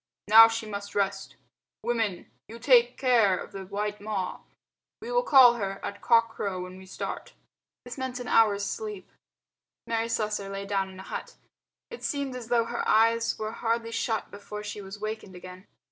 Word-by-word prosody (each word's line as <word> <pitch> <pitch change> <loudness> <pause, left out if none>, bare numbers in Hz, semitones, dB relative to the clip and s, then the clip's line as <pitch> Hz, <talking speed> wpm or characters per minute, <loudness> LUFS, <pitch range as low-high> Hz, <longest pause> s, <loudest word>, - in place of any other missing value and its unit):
Now 225 +2 +10
she 225 0 -3
must 200 -1 -7
rest. 195 -1 -1 0.5
Women, 225 -7 -1 0.2
you 225 - -10
take 245 0 +4
care 230 -8 +3
of - - -8
the 195 -1 -7
white 205 +1 -3
Ma. 205 -3 -3 0.6
We 465 +2 -7
will - - +3
call 265 - +7
her 195 -2 -3
at 200 0 -6
cock 230 -1 +4
crow 195 -4 -4
when 185 +1 -10
we 190 - -13
start." - - -6 0.5
This 245 +2 -8
meant 260 -1 -4
an 245 - -6
hour's 205 -4 +3
sleep. 425 - -5 0.8
Mary 230 0 -1
Slessor 210 -3 -2
lay 195 0 -5
down 195 -1 -1
in 190 0 -12
a - - -8
hut. - - -7 0.6
It 475 - -9
seemed 280 -3 -2
as 245 -3 -7
though 235 -1 +2
her 240 +1 -3
eyes 230 +1 +3
were 215 0 -4
hardly 230 0 -2
shut 225 -1 -2
before 210 +1 -8
she 210 0 -6
was 195 +1 -9
wakened 215 -3 -6
again. 185 +1 -11
215 Hz, 180 wpm, -27 LUFS, 200-235 Hz, 0.8 s, Now